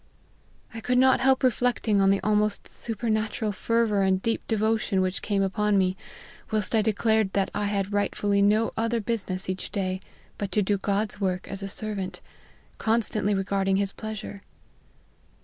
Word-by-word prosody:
" - - -31
I 225 - -6
could 250 +2 +1
not 260 +1 +5
help 265 +1 +3
reflecting 240 -4 +2
on 195 - +4
the 195 0 +3
almost 210 0 +1
super 230 0 -5
natural 215 0 0
fervour 220 0 +1
and 190 -1 +2
deep 225 +4 -1
devotion 220 -2 +1
whteh 185 +1 -1
came 200 -2 0
upon 205 +1 +1
me, 185 -1 +2 0.5
whilst 215 -2 +1
I 220 - +4
declared 220 -1 +1
that 195 -1 0
I 205 - -1
had 200 0 -1
rightfully 205 0 +1
no 215 +3 +3
other 230 +1 0
business 200 -4 -3
each 185 0 -4
day 190 -2 -2 0.4
but 200 -1 -3
to 210 - +3
do 200 +1 0
God's 205 +1 -1
work 185 -1 -1
as 195 0 -6
a 195 - -4
ser 215 +2 -3
vant, 190 -2 -5 0.6
constantly 220 -2 +1
regarding 195 0 0
his 200 0 0
pleasure." 215 -2 -7
205 Hz, 170 wpm, -26 LUFS, 195-220 Hz, 0.6 s, not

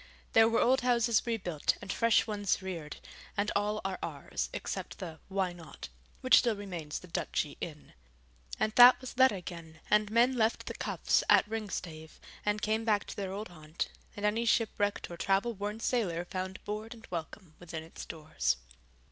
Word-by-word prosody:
There 225 0 +7
were 230 - +2
old 260 +2 +4
houses 240 -2 +2
rebuilt 185 -10 0
and 195 - -4
fresh 230 -1 +4
ones 205 -3 0
reared, 170 -6 -6 0.4
and 205 +1 +1
all 210 +1 +1
are 195 -1 -2
ours, - - -4
except - - -5
the 165 -4 -7
Why 190 -2 -1
Not? 170 -2 -10 0.3
which 255 - +7
still 235 -3 +1
remains 175 -7 -5
the 180 - -10
Duchy 160 -3 -2
Inn. 150 -3 -7 0.7
And 215 - +1
that 245 0 +10
was 255 0 -8
let 260 0 +7
again, 170 -4 -8
and 210 0 +4
men 235 +4 +4
left 225 -1 +1
the - - -4
Choughs - - +1
at - - +6
Ringstave 180 -8 -5 0.2
and 210 0 0
came 220 +1 +1
back 210 -2 +2
to - - -8
their 195 -2 -3
old 205 +2 -5
haunt, 155 -1 -5 0.3
and 205 - -2
any 215 +3 +2
shipwrecked 205 -4 +1
or 170 - -7
travel 195 +6 +1
worn 205 +1 -4
sailor 190 -9 0
found 185 +1 -5
board 215 +3 -5
and 230 - -14
welcome 170 0 -6
within 165 -2 -6
its 160 - -9
doors. 155 - -1
205 Hz, 175 wpm, -31 LUFS, 175-225 Hz, 0.7 s, that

